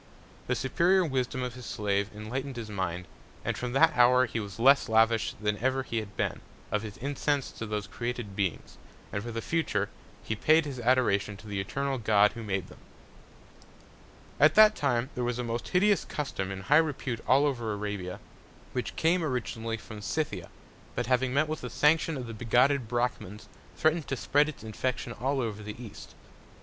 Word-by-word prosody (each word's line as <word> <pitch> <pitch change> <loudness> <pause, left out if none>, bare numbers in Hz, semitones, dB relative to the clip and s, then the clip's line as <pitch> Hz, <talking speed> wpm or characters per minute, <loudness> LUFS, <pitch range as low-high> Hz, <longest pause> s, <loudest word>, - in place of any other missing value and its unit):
The - - +1
superior 175 +8 +3
Wisdom 130 -3 -1
of 125 -1 -3
his 125 -1 -9
Slave 100 -1 -1
enlightned 125 +6 -5
his 115 -3 -6
Mind; 90 -3 -3 0.4
and - - 0
from 125 -1 -4
that 160 +4 +5
Hour 125 +1 +6
he 115 -1 -3
was 100 -2 -6
less 135 +1 +5
lavish 115 0 +3
than 105 -1 -1
ever 130 +2 +1
he 115 - -4
had 105 -2 -8
been, - - -1 0.3
of 105 0 +1
his 105 -2 -8
Incense 140 +1 -1
to 115 - -6
those 105 -1 -2
created 120 -1 -5
Beings, 95 -5 -3 0.3
and 105 - -1
for 120 - -6
the 115 0 -4
future, 105 -12 0 0.4
paid 155 +9 +3
his 135 -4 -5
Adoration 115 -5 +2
to 110 - -14
the 100 -1 -2
eternal 135 +6 -2
God 105 -2 +4
who 115 - -8
made 100 -4 -2
them. - - -15 1.6
At 150 +2 +6
that 215 0 +8
Time 130 -1 0
there 125 - -3
was 120 0 -1
a 125 - -2
most 115 0 -3
hideous 200 +2 +3
Custom 115 -10 -4
in 95 -1 -5
high 145 +10 +4
Repute 140 -7 0
all 140 +3 +5
over 120 -6 -1
Arabia, 105 -3 -4 0.5
which 125 - -3
came 165 +2 +2
originally 115 -5 -2
from 110 -1 -10
Scythia; 155 +8 -3 0.5
but - - -1
having 125 +1 +1
met 140 +4 +2
with 155 0 -4
the 125 - -5
Sanction 155 +2 +2
of 125 - -5
the 115 - -7
bigotted 125 +3 +2
Brachmans, 120 -4 -2 0.3
threatn'd 155 0 +2
to 135 - -2
spread 145 +4 +2
its 145 - -9
Infection 120 +2 -3
all 135 +5 -1
over 110 -4 -3
the 105 +2 -8
East. 115 -4 -10
120 Hz, 185 wpm, -29 LUFS, 105-140 Hz, 1.6 s, that